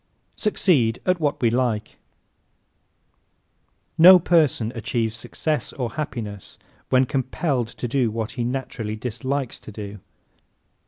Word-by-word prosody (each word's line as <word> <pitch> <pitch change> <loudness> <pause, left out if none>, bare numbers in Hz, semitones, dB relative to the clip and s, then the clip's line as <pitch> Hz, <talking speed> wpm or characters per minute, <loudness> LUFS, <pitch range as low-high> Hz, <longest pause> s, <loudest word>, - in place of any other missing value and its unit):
Succeed 145 - +2
at 185 -1 +2
What 150 -2 0
We 115 - +4
Like 120 -3 0
¶ - - -26 2.0
No 180 +3 +10
person 155 -10 +2
achieves 115 -1 -2
success 150 +6 -2
or 125 -4 -3
happiness 115 -10 -6 0.3
when 130 0 +4
compelled 130 -1 -1
to 120 +1 -6
do 125 -1 +1
what 110 +1 -3
he 120 - -3
naturally 120 -3 -3
dislikes 125 +3 -3
to - - -11
do. 105 0 -8
125 Hz, 120 wpm, -23 LUFS, 115-145 Hz, 2.0 s, No